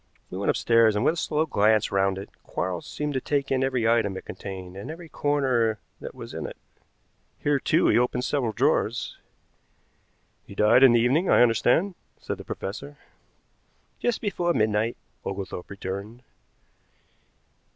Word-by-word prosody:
We 90 - -5
went 100 - 0
upstairs, 115 -2 +4
and 105 - 0
with - - +4
a - - -8
slow 155 0 0
glance 110 -6 +2
round 95 -1 +1
it, 95 - -7
Quarles 90 -2 -4
seemed 150 0 -3
to 130 - -1
take 140 0 -1
in 130 0 +2
every 130 -4 +1
item 115 -4 +2
it - - -9
contained 95 -2 -8
and 100 +7 -7
every 165 +2 -8
corner 130 -8 +1 0.2
that - - -8
was - - -9
in - - -4
it. - - -10 0.8
Here, 145 -1 +1
too, 160 +5 +2
he - - +5
opened 125 0 0
several 130 -6 0
drawers. 120 -1 0 1.3
"He 100 - -11
died 105 +5 +5
in 135 -3 +8
the 120 - +5
evening, 145 +10 +2
I - - +6
understand," 125 - +3 0.3
said - - -5
the - - -7
professor. 140 +9 -6 1.0
"Just 240 -2 0
before 175 -5 0
midnight," 110 +1 +1 0.3
Oglethorpe 95 -2 -5
returned. 100 +4 -6
120 Hz, 160 wpm, -26 LUFS, 100-145 Hz, 1.3 s, in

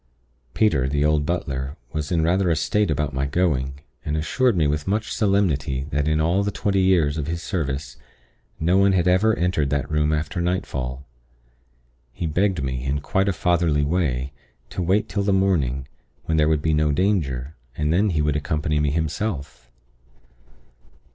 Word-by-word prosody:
"Peter, 75 -13 +2
the 70 +2 +1
old 75 -1 +2
butler, 70 -5 -3 0.2
was 75 0 -3
in 85 -2 +2
rather 90 +2 +2
a 80 - +3
state 105 +4 +1
about 75 -1 -1
my 70 +1 -1
going, 70 -4 0 0.2
and 75 - -2
assured 110 - +1
me 80 - +3
with 75 +2 -1
much 105 +2 -1
solemnity 80 - +1
that 75 +1 0
in 75 0 +2
all 85 +5 +2
the 100 - 0
twenty 100 -1 0
years 85 -6 +2
of 75 - -3
his 85 0 -3
service, 70 - -3 0.6
no 85 +4 +2
one 100 0 +4
had 90 -1 +2
ever 100 +5 +3
entered 85 -5 0
that 70 -2 -1
room 75 0 +1
after 75 +3 -2
nightfall. 70 -7 -3 1.1
He - - -4
begged 90 0 0
me, 65 -1 -3
in 70 +2 -1
quite 95 +7 0
a - - +3
fatherly 85 -4 +1
way, 70 -5 -1 0.4
to - - -3
wait 95 +5 +1
till 100 - -2
the 100 0 +1
morning, 75 -10 +1 0.4
when 80 - 0
there 75 0 +3
would 75 -2 +1
be 80 - +2
no 75 0 +2
danger, 75 -7 0 0.2
and 75 +1 +1
then 100 +4 +3
he 80 -4 0
could 75 -1 +1
accompany 75 0 -1
me 75 -1 +1
himself. 75 - -3
80 Hz, 175 wpm, -23 LUFS, 70-90 Hz, 1.1 s, one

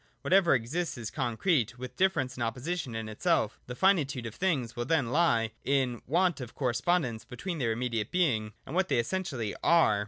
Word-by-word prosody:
Whatever 185 -5 +5
exists 140 +8 -2
is 115 -3 -5
concrete, 125 - 0
with 125 0 -7
difference 185 -10 +1
and 125 - -8
opposition 125 +3 -3
in 110 -1 -4
itself 110 0 0
The 125 - -6
finitude 145 -8 +2
of 115 - -5
things 140 -11 -1
will 120 - -2
then 135 -5 +1
lie 120 -9 +2
in 135 -3 +1
the - - -18
want 175 +1 +2
of 120 -2 -8
correspondence 125 -1 0
between 165 +6 -5
their 115 -4 +1
immediate 115 -2 -2
being, 115 -13 +1
and 135 - -8
what 190 +2 +1
they - - +2
essentially 125 - -2
are. 160 -12 +4
130 Hz, 185 wpm, -29 LUFS, 115-170 Hz, -, Whatever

